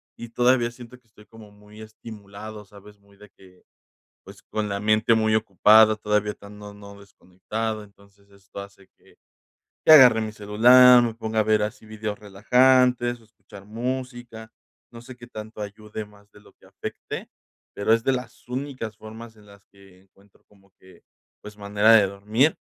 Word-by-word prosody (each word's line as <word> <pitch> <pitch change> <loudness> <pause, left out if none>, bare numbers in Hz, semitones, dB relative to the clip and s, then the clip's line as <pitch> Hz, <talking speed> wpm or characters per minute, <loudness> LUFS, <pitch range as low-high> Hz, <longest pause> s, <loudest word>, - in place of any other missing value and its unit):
y 120 - -10
todavía 120 0 +1
siento 120 +1 -14
que 125 - -39
estoy 105 -1 -21
como 110 -1 -16
muy 105 +1 -17
estimulado, 110 -1 -11
¿sabes?, 105 +1 -17
muy 100 0 -25
de 105 0 -17
que, 90 -1 -21 0.6
pues, - - -15
con 110 -1 -4
la 100 0 -4
mente 110 +2 +2
muy 110 -1 +1
ocupada 110 +1 +4
todavía, 105 -1 -1
tan 105 0 -15
no 105 0 -11
no 100 0 -14
desconectado. 105 +3 -7
Entonces, 100 0 -24
esto 100 0 -15
hace 100 -1 -14
que, - - -25 0.7
que - - +6
agarre 125 -7 +8
mi 110 -1 -5
celular, 120 +4 +5
me 115 -1 -3
ponga 110 -1 -3
a - - +3
ver 105 0 +1
así 110 +2 -6
vídeos 110 -1 -6
relajantes, 120 +4 +2
escuchar 105 -3 -17
música. 120 -1 -7 0.4
No 115 - -12
sé, 125 +1 -13
qué 120 -1 -14
tanto 110 -2 -11
ayude 105 +1 -8
más 105 -1 -22
de - - -19
lo 105 - -22
que - - -25
afecte, - - -8 0.5
pero 100 +2 -2
es 115 0 -1
de 135 - +2
las 125 0 -8
únicas 125 -4 -6
formas 110 +1 -12
en 105 -1 -21
las 100 0 -19
que 95 -2 -21
encuentro 100 +1 -28
como 100 -1 -27
que, 95 -2 -20 0.4
pues, 105 0 -12
manera 105 +2 +2
de 105 -3 +5
dormir. 105 +9 0
110 Hz, 175 wpm, -23 LUFS, 100-115 Hz, 0.7 s, agarre